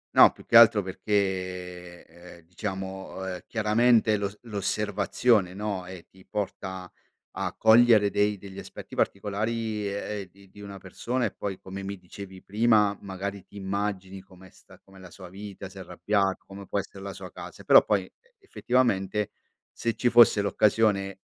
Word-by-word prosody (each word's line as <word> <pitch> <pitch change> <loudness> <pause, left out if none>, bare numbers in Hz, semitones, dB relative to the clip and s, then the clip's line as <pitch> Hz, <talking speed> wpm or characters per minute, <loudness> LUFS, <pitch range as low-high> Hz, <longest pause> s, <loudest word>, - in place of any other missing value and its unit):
No, - - +9
più - - -17
che - - -1
altro 110 -3 +7
perché 90 -3 -3
ehm, 85 +1 -15
diciamo, 95 +1 -6
ehm, 90 -1 -4
chiaramente, 110 0 +3
l'os 100 0 -4
l'osservazione, 105 -1 0
no, 100 -3 -4
ehm, 90 -2 -9
ti 95 0 -20
porta 95 -2 -5 0.4
a - - -3
cogliere 110 -2 +6
dei 105 0 +1
degli 95 0 -10
aspetti - - -11
particolari, 105 +1 -2
ehm, 100 -1 -5
di 95 +1 -21
di 105 - -14
una 100 -1 -8
persona 120 +6 -3
e - - -2
poi 100 -2 -5
come 95 +1 -8
mi 100 +1 -5
dicevi 95 +1 -11
prima, 105 -1 +3
magari 100 0 -6
ti 100 - -21
immagini 95 -1 -4
come 95 -1 -17
sta - - -19
com'è 95 0 -18
la 95 -1 -12
sua 90 +1 -12
vita, 100 +1 -9
se 95 +1 -12
è - - -6
arrabbiato, 95 +2 -1
come 100 0 -11
può - - -2
essere 100 0 -5
la 100 -1 -6
sua - - -10
casa, - - -10
però - - +7
poi 100 -3 +1
e - - -21 0.2
effettivamente 120 - 0 0.4
se 115 -1 -3
ci 120 - +1
fosse 115 -3 +7
l'occasione 100 -2 +1
100 Hz, 165 wpm, -27 LUFS, 95-105 Hz, 0.4 s, No